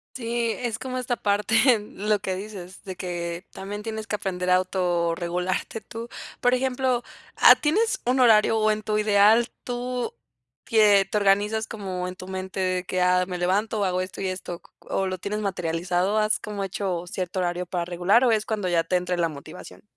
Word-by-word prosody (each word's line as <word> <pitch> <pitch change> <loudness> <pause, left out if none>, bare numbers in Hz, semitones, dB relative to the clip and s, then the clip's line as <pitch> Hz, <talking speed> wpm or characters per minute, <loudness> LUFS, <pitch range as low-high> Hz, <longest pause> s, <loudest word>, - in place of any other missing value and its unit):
Sí, 235 -1 -1
es 235 -3 -2
como 255 +1 -4
esta 250 0 -1
parte, 205 +2 +1 0.2
lo 210 0 -1
que 190 -2 -3
dices 190 -2 -8
de 190 -1 -6
que, 175 -1 -5
también 205 +2 -6
tienes 220 -1 -5
que 215 - -2
aprender 185 -3 -3
a 180 - +6
autorregularte 180 +2 -1
tú. 230 0 -8 0.3
Por 245 0 +3
ejemplo, 255 -1 +1 0.4
ah, - - +9
¿tienes 415 +10 +1
un 255 +2 +2
horario? 225 -2 +5
O 215 - +3
en 215 0 0
tu 210 0 0
ideal, 210 +3 +4
tú 245 0 -3 0.5
quie 205 -3 +5
te 210 - -2
organizas 205 +2 +2
como 185 -5 -5
en 180 - -6
tu 185 - -10
mente 190 0 -5
de 185 -1 0
que: 185 0 -2
"Ah 180 0 +3
me 180 -2 -4
levanto 205 +5 0
o 200 - +1
hago 185 0 0
esto 185 +1 -6
y 195 - -1
esto". 185 -2 -5
Q - - -24
q - - -24
¿o 190 - 0
lo 185 0 -3
tienes 205 +4 -3
materializado? 180 +1 0
¿Has 215 0 +2
como 205 -1 -5
hecho 185 -2 -3
cierto 185 +1 -3
horario 175 0 -1
para 175 -1 -3
regular 180 +7 +3
o 240 - +4
es 220 -1 +1
cuando 205 -4 -2
ya 170 -1 +2
te 180 +2 +1
entre 180 0 -2
la 165 -1 +1
motivación? 150 +4 -11
195 Hz, 200 wpm, -25 LUFS, 180-220 Hz, 0.5 s, ah